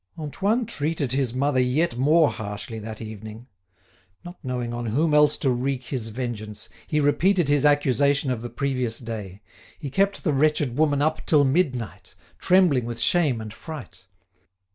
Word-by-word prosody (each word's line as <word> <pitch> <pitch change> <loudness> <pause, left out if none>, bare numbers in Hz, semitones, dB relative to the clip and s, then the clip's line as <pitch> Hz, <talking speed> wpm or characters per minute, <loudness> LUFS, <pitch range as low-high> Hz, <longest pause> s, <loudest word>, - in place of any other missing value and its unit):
Antoine 200 - -1
treated 150 - -2
his 130 -2 +1
mother 140 0 +1
yet 130 +3 +1
more 150 +5 +4
harshly 105 +1 -6
that 110 +1 -7
evening. 110 +1 -9 0.8
Not 175 +1 -10
knowing 125 -2 -3
on 120 0 -4
whom 150 +8 +1
else 150 0 +5
to 135 - +1
wreak 130 +1 -2
his 120 -3 -4
vengeance, 110 -3 -5 0.2
he 150 - 0
repeated 170 +4 +2
his 145 0 +4
accusation 140 -1 +2
of 120 -3 -3
the 120 - -6
previous 125 -2 -2
day; 105 -5 -7 0.3
he 140 -5 -7
kept 195 +5 +1
the 155 - +1
wretched 145 -3 +1
woman 145 -1 +2
up 155 +1 0
till 150 -3 +5
midnight, 125 - -1 0.2
trembling 175 -10 +3
with 120 0 -5
shame 140 0 +2
and 110 -1 -7
fright. 150 - -10
135 Hz, 160 wpm, -24 LUFS, 115-150 Hz, 0.8 s, else